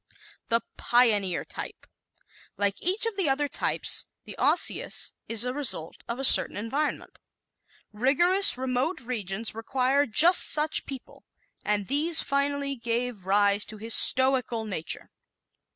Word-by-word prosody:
The 230 -1 -1 0.2
Pioneer 210 -7 0
Type - - -10 0.4
¶ - - -37 0.3
Like 200 0 -3
each 380 +6 +2
of 455 -3 -5
the 370 -7 -1
other 290 +2 -2
types, - - -3 0.2
the - - -12
Osseous - - 0 0.2
is 230 +1 +1
a 250 - -4
result 260 - -2
of 235 - -6
a 270 - -7
certain 265 - +4
environment. 270 +8 -5 0.7
Rigorous, 345 - +4
remote 260 +6 -4
regions 225 -3 -5
require 260 +5 -2
just 325 - +7
such 305 0 +2
people, 270 -2 -12 0.4
and 205 -1 -2
these 310 - +2
finally 280 0 -3
gave 235 -4 -5
rise 205 +1 +1
to 215 - -11
this 225 +2 0
stoical 255 -3 +3
nature. 180 -7 -4
250 Hz, 135 wpm, -24 LUFS, 215-285 Hz, 0.7 s, just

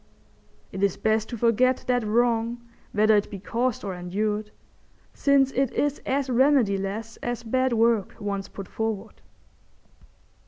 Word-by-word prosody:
It 190 - -5
is 200 -2 +1
best 220 0 0
to 240 - -5
forget 240 +3 +2
that 245 -1 +1
wrong 230 +1 +1 0.3
whether 215 +1 +4
it 205 - +1
be 205 - -6
caused 235 +5 -2
or 195 -2 -3
endured, 210 +4 -2 0.6
since 275 -1 +3
it 270 -2 0
is 290 0 0
as 275 0 0
remediless 225 -5 +1
as 240 -1 -3
bad 255 +3 +1
work 225 -3 +2
once 200 -1 -3
put 195 -2 -9
forward. 220 -1 -4
225 Hz, 140 wpm, -25 LUFS, 205-250 Hz, 0.6 s, whether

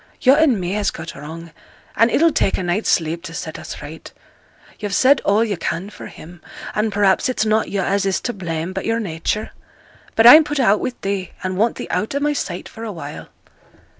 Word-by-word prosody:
'Yo' 260 - +5
and 285 -7 +3
me 180 0 -3
has 205 0 0
got 165 0 -7
wrong, 160 +4 -9 0.4
and 230 +1 +4
it'll 330 +6 +3
take 195 - +1
a - - -3
night's 175 +5 -1
sleep 165 0 +1
to 170 -2 -9
set 160 -1 -6
us - - -8
right. 155 +2 -10 0.7
Yo've 205 -2 -3
said 270 +1 +4
all 205 +3 +2
yo' 210 -3 -1
can 175 +3 -4
for - - -10
him; 170 +2 -13 0.3
and 215 +1 0
perhaps 200 +2 +2
it's 250 -3 0
not 215 0 +1
yo' 195 -2 -1
as 200 +2 0
is 190 - +1
to 245 - -3
blame, 170 -2 -4
but - - -4
yo'r 225 0 0
nature. 195 +2 -3 0.6
But 225 - +4
I'm 300 +7 +11
put 295 -1 -3
out 215 -5 +4
wi' 255 - -3
thee, 195 -2 -3
and 185 0 -2
want 220 +5 +1
thee - - -6
out 220 +6 -1
o' - - +1
my 295 +1 +1
sight 180 -10 -4
for 225 - -10
awhile.' 165 -10 -7
200 Hz, 215 wpm, -20 LUFS, 175-230 Hz, 0.7 s, I'm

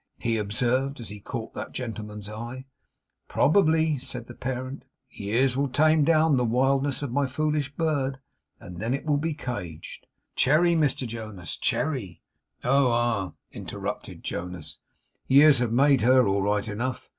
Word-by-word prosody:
he 115 -1 -1
observed, 125 +6 0
as 115 - -8
he 105 0 -8
caught 110 +2 -6
that - - -6
gentleman's 105 -4 -6
eye. 120 +5 -7 0.6
'Probably,' 160 -3 +3
said 125 -2 -4
the - - -10
parent. 130 +1 -5 0.3
'Years 125 +6 0
will 140 +1 +1
tame 155 +3 +3
down 155 -2 +4
the 125 - +2
wildness 135 +4 +1
of 140 - -3
my 140 +2 +1
foolish 150 +1 -1
bird, 145 -5 0 0.4
and 90 -1 -10
then 115 +5 0
it 140 - -7
will 150 -2 +2
be 160 0 -2
caged. 90 - -6 0.3
But - - -46
Cherry, 165 +6 +4
Mr 150 -5 +1
Jonas, 110 -7 -6
Cherry 105 - -2 0.2
' - - -40
'Oh, 135 +1 +4
ah!' 115 -6 0 0.2
interrupted - - -6
Jonas. 90 -2 -6 0.5
'Years 140 0 +7
have 120 -2 0
made 135 +2 +4
her 125 +1 +5
all 100 0 +1
right 105 +1 0
enough. 120 +5 -3
130 Hz, 155 wpm, -26 LUFS, 110-145 Hz, 0.6 s, Years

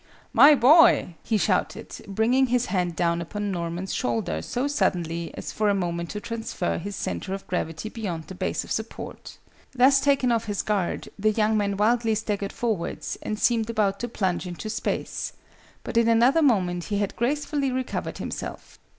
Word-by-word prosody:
"My 280 +5 +8
boy!" 280 - +6
he 220 - 0
shouted, - - 0 0.2
bringing 230 +6 +2
his 245 0 +1
hand 180 -5 -1
down 170 0 +1
upon 205 +4 -3
Norman's 175 +1 -3
shoulder 110 -10 -1
so 245 - -2
suddenly 170 - -1
as - - -5
for 215 -1 +1
a 200 - +3
moment 170 -2 -2
to 210 - -4
transfer 225 -5 -3
his 200 +4 -5
centre 195 0 -3
of 195 - -9
gravity 165 +1 -3
beyond 195 -8 -4
the 190 - -10
base 180 - -2
of - - -11
support. - - -5 0.4
Thus 270 +2 +5
taken 275 -3 +3
off 230 -1 +1
his 205 -2 -2
guard, 200 -5 -1
the 215 +2 +3
young 215 0 +2
man 200 -2 0
wildly 225 +1 +2
staggered 205 -2 -2
forwards, 220 -8 -3
and 215 - -3
seemed 230 0 +2
about 205 -3 +1
to 240 - -2
plunge 190 -5 -1
into 180 +5 -5
space: - - -3 0.5
but - - -3
in 230 0 +4
another 240 +7 +4
moment 180 - +2
he 205 - -2
had 200 -1 -1
gracefully 280 +2 0
recovered 255 0 -3
himself. - - -7
210 Hz, 175 wpm, -25 LUFS, 180-240 Hz, 0.5 s, My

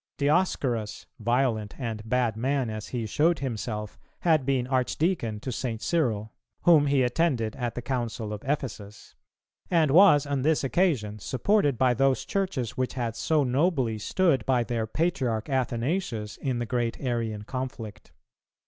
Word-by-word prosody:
Dioscorus, 140 - 0
violent 115 -2 0
and 115 -4 -3
bad 125 -3 +1
man 130 0 0
as 110 -1 -6
he 120 -3 -3
showed 155 +10 +2
himself, 110 -5 -4 0.2
had 155 -6 +2
been 130 -3 +1
Archdeacon 130 - 0
to 130 - -4
St. 115 -2 -3
Cyril, 110 -9 -1 0.3
whom 155 -4 +6
he 140 -2 +3
attended 125 -4 0
at 120 -2 -3
the 120 - -5
Council 120 -4 -3
of 105 - -6
Ephesus; 120 -7 -4 0.6
and 160 -5 +3
was 165 -4 +7
on 140 -2 -1
this 155 +2 +2
occasion 130 - +1
supported 145 - +1
by 130 0 +3
those 135 +2 +1
Churches 165 - -2
which 130 +1 -2
had 120 -3 -2
so 155 +5 +1
nobly 130 -4 +1
stood 140 - +1
by 125 -3 +3
their 115 -2 -2
patriarch 130 - -1
Athanasius 125 - -1
in 130 -3 -2
the 120 - -2
great 120 0 -2
Arian 115 -5 -2
conflict. 120 -3 -6
125 Hz, 150 wpm, -27 LUFS, 115-145 Hz, 0.6 s, was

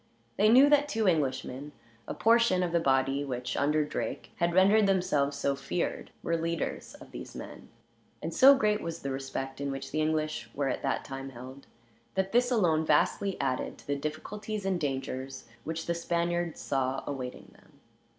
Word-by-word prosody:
They 210 +1 +4
knew 260 +5 +8
that 290 0 +4
two 225 -6 0
Englishmen, 145 -3 -1 0.3
a - - -4
portion 230 -5 +4
of 175 - -1
the 170 - +3
body 135 -1 +2
which, 125 -2 -4
under 150 +1 +2
Drake, - - -4
had 170 0 +1
rendered 200 +3 +5
themselves 165 -7 +1
so 140 0 0
feared, 140 +6 -3
were 170 - 0
leaders 165 0 -3
of - - -14
these - - -9
men; - - -9 0.5
and - - -5
so 275 +1 +8
great 210 -4 +1
was 165 0 -5
the 140 - -2
respect 135 0 -5
in 140 - -1
which 135 0 -5
the 155 - 0
English 155 0 -1
were 140 -1 0
at - - -2
that - - -1
time 135 0 -6
held, 130 +2 -11 0.5
that 190 0 0
this, 245 +1 +3
alone, 175 -10 +2
vastly 185 +5 +1
added 130 -2 -2
to - - -17
the 145 - -1
difficulties 200 +8 -5
and 190 -2 0
dangers 135 -2 -4 0.2
which 160 +1 -3
the 170 - 0
Spaniards 170 0 -1
saw 135 -1 -1
awaiting 130 -3 -6
them. - - -23
155 Hz, 180 wpm, -29 LUFS, 135-190 Hz, 0.5 s, knew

